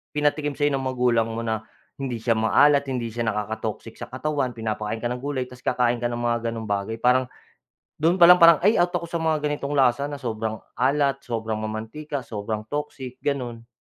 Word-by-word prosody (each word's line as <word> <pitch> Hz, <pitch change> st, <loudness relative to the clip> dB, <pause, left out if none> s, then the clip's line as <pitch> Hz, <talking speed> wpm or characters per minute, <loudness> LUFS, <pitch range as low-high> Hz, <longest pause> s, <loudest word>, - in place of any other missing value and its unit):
pinatikim 150 Hz, 0 st, 0 dB
sa'yo 145 Hz, -1 st, +1 dB
ng 135 Hz, -1 st, -1 dB
magulang 125 Hz, -3 st, +2 dB
mo 115 Hz, 0 st, -4 dB
na, 110 Hz, -1 st, -3 dB, 0.3 s
hindi 135 Hz, -3 st, -3 dB
siya 115 Hz, -1 st, +1 dB
maalat, 140 Hz, +5 st, +4 dB
hindi 120 Hz, -3 st, -3 dB
siya 115 Hz, +1 st, -3 dB
nakaka-toxic 110 Hz, +1 st, -4 dB
sa -, -, -6 dB
katawan, 130 Hz, -2 st, -2 dB
pinapakain 110 Hz, 0 st, -3 dB
ka 120 Hz, -, 0 dB
ng 125 Hz, -, -3 dB
gulay, 135 Hz, -1 st, -2 dB
tapos 125 Hz, 0 st, -14 dB
kakain 120 Hz, -1 st, +2 dB
ka 120 Hz, -, 0 dB
ng 120 Hz, 0 st, -3 dB
mga 120 Hz, -1 st, +1 dB
gano'ng 115 Hz, -1 st, -5 dB
bagay, 100 Hz, +2 st, -1 dB
parang, 125 Hz, +1 st, +4 dB, 0.7 s
do'n 165 Hz, +4 st, +3 dB
pa 175 Hz, -, +8 dB
lang, 180 Hz, -, +9 dB
parang, 165 Hz, -2 st, +8 dB
"Ay, 205 Hz, +2 st, +4 dB
out 175 Hz, 0 st, +3 dB
ako 175 Hz, -1 st, -1 dB
sa 170 Hz, -, -1 dB
mga 160 Hz, -2 st, +1 dB
ganitong 145 Hz, -1 st, -2 dB
lasa 130 Hz, 0 st, +3 dB
na 145 Hz, -, -5 dB
sobrang 110 Hz, -4 st, -3 dB, 0.2 s
alat, 140 Hz, +1 st, +2 dB
sobrang 110 Hz, -3 st, -2 dB
mamantika, 110 Hz, +7 st, -5 dB
sobrang 105 Hz, 0 st, -4 dB
toxic", 130 Hz, -3 st, -5 dB
gano'n. 125 Hz, -5 st, -3 dB
125 Hz, 195 wpm, -24 LUFS, 115-145 Hz, 0.7 s, lang